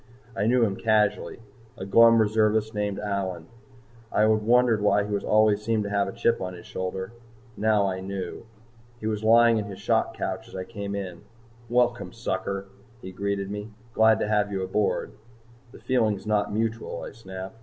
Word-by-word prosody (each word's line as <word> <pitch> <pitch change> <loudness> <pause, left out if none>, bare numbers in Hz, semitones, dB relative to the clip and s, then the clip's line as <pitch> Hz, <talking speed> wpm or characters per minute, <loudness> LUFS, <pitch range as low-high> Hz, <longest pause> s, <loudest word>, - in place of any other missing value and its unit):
I 105 -1 0
knew 125 +1 +4
him 95 -3 -2
casually, 110 0 +1 0.4
a 95 - -6
glum 115 +3 +6
reservist 110 0 +2
named 105 -1 -2
Allyn. 95 -5 -3 0.7
I - - +1
had 110 - +5
wondered 120 -1 +3
why 105 0 +3
he 105 0 -2
always 105 0 +3
seemed 110 0 0
to 100 - -5
have 100 -1 +1
a - - -4
chip 115 +1 0
on 90 -1 -4
his 85 - -12
shoulder. 95 +2 -4 0.4
Now 105 -1 +2
I 95 -1 -2
knew. 95 +3 -6 0.5
He 110 - -8
was 110 -1 -2
lying 115 0 +5
in 105 - -3
his 100 -2 -8
shock - - 0
couch - - -4
as - - -13
I 95 - -4
came 100 -1 -6
in. 90 -4 -6 0.5
"Welcome, 120 0 +1
sucker," 100 -3 -3 0.3
he 95 - -9
greeted 100 +1 -3
me. 105 +1 -5 0.2
"Glad 110 -1 +4
to - - 0
have 105 -1 +1
you 95 -1 -2
aboard." 105 +2 -1 0.6
"The - - -13
feeling's 110 -6 0
not 105 -1 0
mutual," 110 +1 -3
I - - -7
snapped. 95 0 -9
105 Hz, 180 wpm, -26 LUFS, 100-110 Hz, 0.7 s, glum